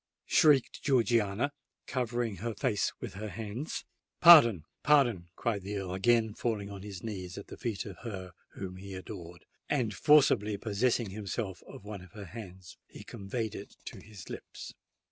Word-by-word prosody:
shrieked 145 -5 +4
Georgiana, 120 -2 +2 0.3
covering 120 -4 -2
her 115 +4 -4
face 105 -1 0
with - - -6
her 105 +2 -5
hands. 110 - -5 0.3
"Pardon—pardon!" 120 - +6
cried 110 -4 -1
the 100 +2 -4
Earl, 95 -2 -4
again 110 +3 +3
falling 105 -3 -2
on 100 -1 -8
his 100 -2 -8
knees 95 -5 -5
at 100 - -9
the - - -7
feet 115 -5 -3
of 95 -5 -9
her 95 -6 -6 0.2
whom 95 -1 -6
he 95 0 -8
adored; 90 -3 -9 0.2
and, 120 -7 +1
forcibly 110 -6 +4
possessing 110 +1 0
himself 100 -2 -4
of - - -11
one 105 -2 -6
of 90 -2 -15
her 105 -2 -8
hands, 95 -2 -10
he - - -11
conveyed 110 +2 -4
it 100 - -9
to - - -8
his 105 -4 -12
lips. - - -8
105 Hz, 160 wpm, -31 LUFS, 95-120 Hz, 0.3 s, Pardon—pardon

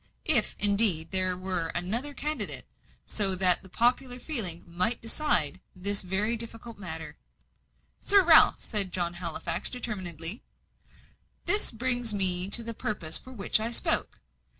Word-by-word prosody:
If, 245 -9 +2
indeed, 200 -6 +3
there 185 -1 0
were 185 -3 -3
another 235 +12 -4
candidate, 300 +2 -4 0.4
so 195 -3 0
that 180 -1 +7
the 190 - -17
popular 245 +4 -2
feeling 215 - 0
might 180 +8 -3
decide 225 - +3 0.2
this 200 +2 -1
very 195 +5 -2
difficult 230 -1 -3
matter 160 -5 -8 0.4
" - - -45
"Sir 400 -1 +4
Ralph," 325 -2 +5
said 200 -4 -1
John 175 -2 -3
Halifax, 175 -2 -3
determinedly, 190 - -4 1.0
"this 415 +1 +1
brings 245 -1 -4
me 185 -1 +4
to 230 +3 +4
the 230 0 -7
purpose 175 -8 -5
for 260 - -16
which 215 -3 -2
I 220 +1 -5
spoke. 235 - -2
205 Hz, 140 wpm, -25 LUFS, 180-235 Hz, 1.0 s, that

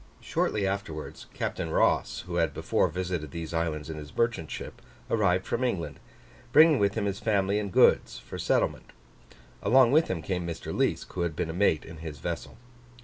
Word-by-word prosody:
Shortly 105 -2 0
afterwards, 95 -6 -4
Captain - - -3
Ross, - - +2
who 90 -1 -5
had 80 -4 +1
before - - +1
visited 90 -4 -3
these 85 +1 -6
islands 80 -2 -1
in 80 -1 -6
his 75 -1 -10
merchant 115 -9 0
ship, - - -7 0.3
arrived 95 -4 +2
from 125 - -1
England, 85 - -2 0.5
bringing 155 -1 +7
with 100 -1 +2
him 110 -3 -1
his 100 0 -2
family 100 -2 +1
and 100 -2 -4
goods - - +4
for - - -9
settlement: - - 0 0.7
along 125 +3 +5
with 155 +3 +4
him 85 -4 -3
came 90 -1 -2
Mr. 85 -1 -5
Liesk, - - 0
who 90 - -3
had 85 -3 -1
been 80 - -2
a - - -7
mate 85 -4 +2
in 85 - -10
his 80 -2 -7
vessel. - - -5
90 Hz, 185 wpm, -28 LUFS, 80-100 Hz, 0.7 s, bringing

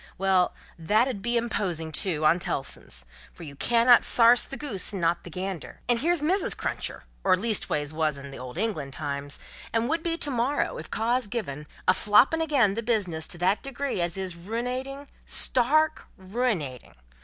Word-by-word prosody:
Well, 190 -1 +2 0.2
that 215 +9 +3
'ud 235 -7 -4
be 240 +2 0
imposing, 185 -9 -2
too, 155 -2 -1
on 165 +3 +5
Tellson's. 65 - -4 0.3
For - - -12
you 145 -3 -9
cannot 235 - +5
sarse 240 +1 +6
the 275 - -8
goose 225 -12 -3
and 200 - -4
not 170 0 +1
the - - -9
gander. 185 -1 -6
And 240 -1 +2
here's 335 +2 +1
Mrs. 375 +6 +2
Cruncher, - - -3 0.2
or 185 -1 +4
leastways 180 -8 -1
wos 155 -2 0
in 140 0 -9
the 135 - -9
Old 125 +3 -8
England 175 -10 -2
times, 145 -1 -3 0.3
and 230 +1 +1
would 325 +1 0
be 330 0 -1
to 290 -4 -2
morrow, 255 +4 0
if - - -9
cause 240 +2 0
given, 150 - -5 0.2
a 185 - +7
floppin' 225 - +4
again 275 -11 +3
the 230 - -2
business 190 -9 -1
to 175 - -7
that 185 +4 +1
degree 275 -6 -3
as 170 +1 -2
is 190 -2 -2
ruinating 250 +9 -4 0.2
stark 305 +5 +3
ruinating! 185 - -3
205 Hz, 180 wpm, -26 LUFS, 165-245 Hz, 0.3 s, a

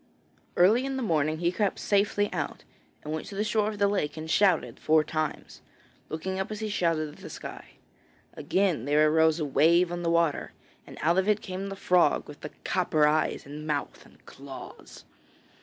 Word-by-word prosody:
Early 215 +8 +5
in 270 0 -3
the 260 - -2
morning 155 -5 +1
he 170 +1 0
crept 200 +1 -1
safely 205 0 +1
out, - - -4 0.4
and 150 - -5
went 155 - -4
to 200 - -8
the 205 - 0
shore 215 -1 +1
of 215 - -6
the 200 0 +3
lake 160 -7 -1
and 155 0 -6
shouted 185 0 +2
four 155 0 +3
times, 155 0 -4 0.5
looking 190 +4 -4
up 190 - -2
as 215 -1 -5
he 215 -1 -3
shouted 165 -6 0
at 150 - -14
the - - -10
sky. - - -9 0.6
Again 185 - 0
there 150 +2 +3
arose 160 0 +3
a 155 - -1
wave 170 +5 +3
on 175 0 -3
the 170 - 0
water, 170 -2 +1 0.3
and - - -11
out 170 +4 +3
of 190 +2 0
it 210 0 +2
came 190 +1 -5
the 195 - -5
frog, 180 -5 +2
with 150 - -12
the 150 - -6
copper 160 -4 +2
eyes 155 +1 +1
and 150 +2 -8
mouth 145 -2 -3
and - - -22
claws. 135 0 -11
170 Hz, 195 wpm, -27 LUFS, 155-200 Hz, 0.6 s, Early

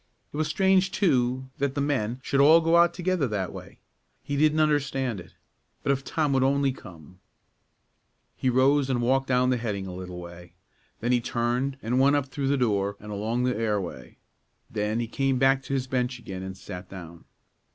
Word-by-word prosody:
It - - -5
was 155 0 0
strange, 190 +3 +3
too, 130 - +1
that 140 0 -1
the - - -1
men 130 -4 -1
should 140 - 0
all 155 +4 +7
go 165 +1 +2
out 170 0 +6
together 180 -4 0
that 100 -5 -3
way; - - -10 0.5
he 145 - -3
didn't 155 +2 +3
understand 135 -7 +1
it. 90 - -13 0.5
But - - +2
if 135 -1 -1
Tom 150 0 0
would 135 - +2
only 140 0 +2
come 90 - -13 1.2
He 130 - 0
rose 135 +2 +3
and 125 -2 +1
walked 130 +3 +1
down 125 0 +2
the 125 - +2
heading 105 -5 -3
a 95 - -7
little 90 -1 -7
way; 85 0 -11 0.5
then 120 - 0
he 120 -1 +3
turned 120 +4 -1
and 120 +3 +1
went 140 +2 +5
up 145 -2 +1
through 135 0 -4
the 140 +1 +2
door 100 -5 0
and 105 0 -9
along 110 +4 -1
the 125 0 +1
airway; 100 - -3 0.5
then 110 +1 -1
he 120 - -1
came 135 +2 0
back 135 +1 +3
to - - -4
his 130 -1 -1
bench 125 -1 -1
again, 95 -6 -7
and 95 0 -7
sat 90 0 -9
down. 85 -3 -10
125 Hz, 195 wpm, -26 LUFS, 105-140 Hz, 1.2 s, all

